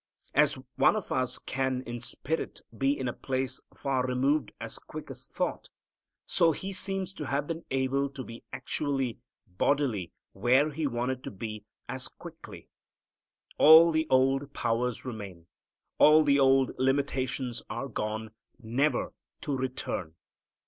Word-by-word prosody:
As - - +4 0.2
one - - +5
of - - -4
us 130 -1 0
can, 130 -1 -2
in 120 -1 -6
spirit, 160 +6 -2
be 135 +1 +1
in 130 - -2
a 120 - -1
place 130 -1 -2
far 135 -2 -1
removed 135 +4 +1
as - - -6
quick - - -9
as - - -8
thought, - - -3 0.6
so 165 -1 +3
He 195 +6 -5
seems 190 0 -1
to 150 -6 -6
have 140 +1 0
been 165 +1 -5
able 135 +1 +1
to 135 -1 -7
be 115 -1 -10
actually, 135 -5 -2 0.3
bodily, 105 - 0 0.2
where 130 +9 +3
He 150 +1 -1
wanted 130 +1 -2
to - - -3
be 105 +1 -7 0.2
as - - -3
quickly. - - -11 0.9
All 160 +2 +9
the 160 0 +1
old 135 +2 +3
powers 120 +1 -1
remain. 100 -8 -7 0.5
All 155 +1 +8
the 140 -1 +4
old 135 -1 +4
limitations 130 -2 0
are 120 +6 -3
gone, 110 -1 -3 0.3
never 130 +5 0 0.3
to 145 - -2
return. 125 -10 -3
130 Hz, 140 wpm, -29 LUFS, 120-145 Hz, 0.9 s, All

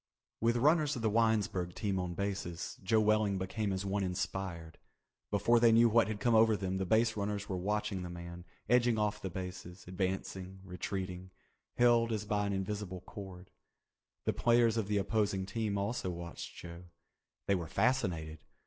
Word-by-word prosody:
With 115 +1 +2
runners 150 +3 +3
of 120 - -5
the 110 - +2
Winesburg 105 -5 +1
team 100 -3 -1
on 90 -1 -3
bases, 95 -3 -4
Joe 110 +4 +3
Welling 105 -2 +2
became 100 +2 -2
as 95 +1 -2
one 100 +1 0
inspired. 90 -3 -4 0.5
Before 105 +4 +3
they 115 -1 +6
knew 115 +1 +6
what 115 -2 +4
had 105 -1 -3
come 120 +1 +2
over 110 -1 +5
them, 95 0 -2
the 95 - -2
base 110 +3 +3
runners 100 -1 -2
were 95 - -2
watching 100 0 -1
the 90 - -5
man, 85 0 -8 0.2
edging 120 0 +4
off 105 -1 0
the 95 - -3
bases, 90 0 -7
advancing, 95 0 -3
retreating, 95 0 -5 0.5
held 120 -1 +4
as 105 -1 -2
by 105 -1 0
an 100 - -1
invisible 95 -1 -3
cord. 95 -2 -10 0.7
The - - +1
players 120 -1 +3
of 110 -4 -1
the 105 0 +1
opposing 100 -2 0
team 105 0 -2
also 100 0 -2
watched 85 -1 -7
Joe. 85 +1 -9 0.6
They 100 - +2
were 85 -4 -1
fascinated. 90 - 0
100 Hz, 170 wpm, -33 LUFS, 95-110 Hz, 0.7 s, they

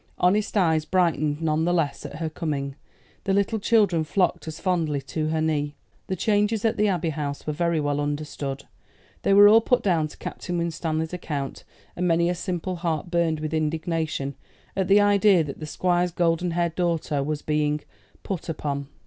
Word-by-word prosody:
Honest 205 +4 +2
eyes 160 -5 +3
brightened 155 -3 +1
none 155 0 +1
the 175 - +2
less 160 -5 -1
at - - -10
her 160 +1 -3
coming, 145 -4 -3 0.5
the 195 -1 +2
little 200 +2 +1
children 200 -6 +3
flocked 180 +1 0
as 160 - -6
fondly 165 -6 0
to 155 +3 -3
her 160 0 0
knee. 150 -2 0 0.3
The 190 - -1
changes 210 +2 +1
at 225 0 +2
the 210 -1 +2
Abbey 175 -4 0
House 145 -1 -4
were 150 - -1
very 170 +1 +1
well 145 -1 0
understood. 145 -2 -3 0.6
They 195 - +3
were 205 +1 +9
all 220 +2 +7
put 250 +2 +2
down 165 -6 +2
to - - -14
Captain 175 -1 -5
Winstanley's 160 -1 -2
account; 145 -6 -4 0.3
and 180 0 0
many 170 +1 +3
a - - 0
simple 180 0 -3
heart 170 0 -2
burned 170 -3 +1
with 155 0 -3
indignation 160 -2 -1 0.4
at 190 -2 0
the 200 +1 +6
idea 205 -3 +5
that 140 -3 -7
the 155 - -6
Squire's 175 +3 +1
golden 170 0 +1
haired 170 -1 0
daughter 165 -5 0
was 150 +1 -3
being 150 0 0 0.4
"put 185 -3 -4
upon." 140 -3 -3
165 Hz, 185 wpm, -25 LUFS, 150-180 Hz, 0.6 s, were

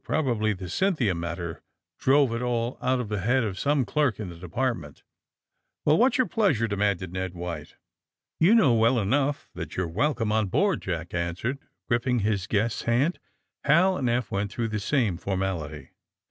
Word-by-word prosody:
Probably 120 -8 0
the 95 -1 -7
^Cynthia' 125 - +1
matter 85 0 -5 0.4
drove 135 -2 +4
it 115 - -2
all 120 0 -1
out 130 +1 +1
of 125 - -3
the 105 -1 -2
head 120 +6 +2
of 95 -4 -3
some 140 -2 +2
clerk 140 -8 +1
in 105 -4 -4
the 85 - -9
De 85 +1 -10
partment. 100 - -3 0.3
' - - -63
' - - -22
^'Well, 150 +2 +5
whafs 260 +3 +4
your 255 - +3
pleasure?" 170 - +1
demanded 100 -3 -1
Ned 95 -1 -3
White.; 85 -1 -6 0.7
*^You 190 +8 +6
know 140 - +5
well 115 +2 +3
enough 135 +7 0
that - - -7
you 95 - +1
are - - -2
welcome 115 - 0
on 110 -1 +2
board," 190 - +1
Jack 85 -2 -4
answered, 90 +10 -2 0.3
gripping 120 0 +1
his 100 -2 0
guest's 110 +2 0
hand. 130 +9 +1 0.5
Hal 185 +6 +4
and 130 -8 0
Eph 120 -1 -1
went 100 +1 -1
through 115 -2 -2
the 110 0 -2
same 110 - +1
for 95 +2 -3
mality. 80 -6 -4
115 Hz, 190 wpm, -26 LUFS, 95-135 Hz, 0.7 s, ^You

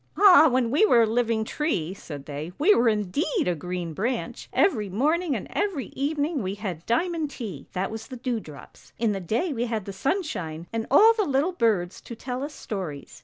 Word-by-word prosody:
' - - -34
Ah, 360 -6 +8
when 250 -2 +1
we 300 +10 +4
were 240 - +6
a - - +4
living 225 0 +1
tree,' 205 - -2
said 145 -7 -9
they, 150 +3 -6
' - - -37
we 370 +8 +5
were 235 - +4
indeed 215 - 0
a 180 - +2
green 175 0 -4
branch! 235 - -3
Every 215 - +2
morning 300 - +1
and 210 - -4
every 390 -9 -2
evening 290 +1 -1
we 190 0 -3
had 190 -6 -5
diamond 320 +5 0
tea, 205 - -7
that 190 +2 -2
was 220 0 -7
the 255 - -8
dew 240 -1 -2
drops. 150 -8 -14
In 230 -2 +1
the 195 - -2
day 230 - -1
we 240 -1 -1
had 220 -4 -3
the 200 - -6
sunshine, 190 - -2
and 225 0 -2
all 430 - +7
the 445 -2 +1
little 290 +3 +1
birds 205 - 0
to 235 - -9
tell 250 +2 -5
us 295 +1 -6
stories. 175 -9 -6
230 Hz, 215 wpm, -25 LUFS, 190-295 Hz, -, Ah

